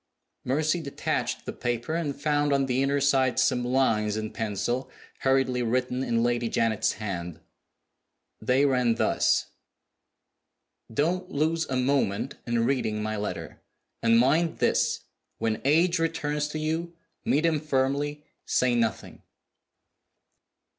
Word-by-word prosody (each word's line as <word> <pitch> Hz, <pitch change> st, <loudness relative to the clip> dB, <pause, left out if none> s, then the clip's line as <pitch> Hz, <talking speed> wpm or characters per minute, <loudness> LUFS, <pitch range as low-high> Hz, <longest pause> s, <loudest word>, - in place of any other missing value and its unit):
Mercy 155 Hz, +6 st, +1 dB
detached 140 Hz, -3 st, -2 dB
the -, -, -4 dB
paper, 120 Hz, +5 st, -2 dB
and 155 Hz, -4 st, -2 dB
found 145 Hz, 0 st, +1 dB
on 140 Hz, -1 st, +2 dB
the 130 Hz, 0 st, 0 dB
inner 140 Hz, +1 st, +1 dB
side 135 Hz, -2 st, +2 dB
some 125 Hz, -, +2 dB
lines 115 Hz, -5 st, +1 dB
in 110 Hz, 0 st, -4 dB
pencil, 115 Hz, +4 st, -2 dB, 0.3 s
hurriedly 130 Hz, -2 st, +2 dB
written 125 Hz, +2 st, 0 dB
in 115 Hz, -2 st, +1 dB
Lady 120 Hz, -1 st, 0 dB
Janet's 110 Hz, -1 st, +1 dB
hand. 90 Hz, -6 st, -5 dB, 1.0 s
They 130 Hz, +3 st, +3 dB
ran 125 Hz, -4 st, +2 dB
thus. -, -, +1 dB, 1.4 s
"Don't 175 Hz, +9 st, 0 dB
lose 160 Hz, +1 st, 0 dB
a 130 Hz, -, -1 dB
moment 125 Hz, -6 st, 0 dB
in 120 Hz, -1 st, +1 dB
reading 110 Hz, -5 st, 0 dB
my 110 Hz, 0 st, -2 dB
letter. 105 Hz, 0 st, -5 dB, 0.4 s
And 115 Hz, 0 st, +4 dB
mind 155 Hz, +7 st, +3 dB
this, -, -, +1 dB, 0.4 s
when 110 Hz, -1 st, -1 dB
H. 165 Hz, +5 st, +3 dB
returns 150 Hz, -2 st, -1 dB
to 150 Hz, -, -5 dB
you 160 Hz, +2 st, -2 dB, 0.3 s
meet 150 Hz, +4 st, +2 dB
him 160 Hz, -2 st, +2 dB
firmly: 145 Hz, +1 st, -1 dB, 0.2 s
say 125 Hz, -1 st, +2 dB
nothing." 115 Hz, -3 st, -1 dB
130 Hz, 125 wpm, -27 LUFS, 115-150 Hz, 1.4 s, And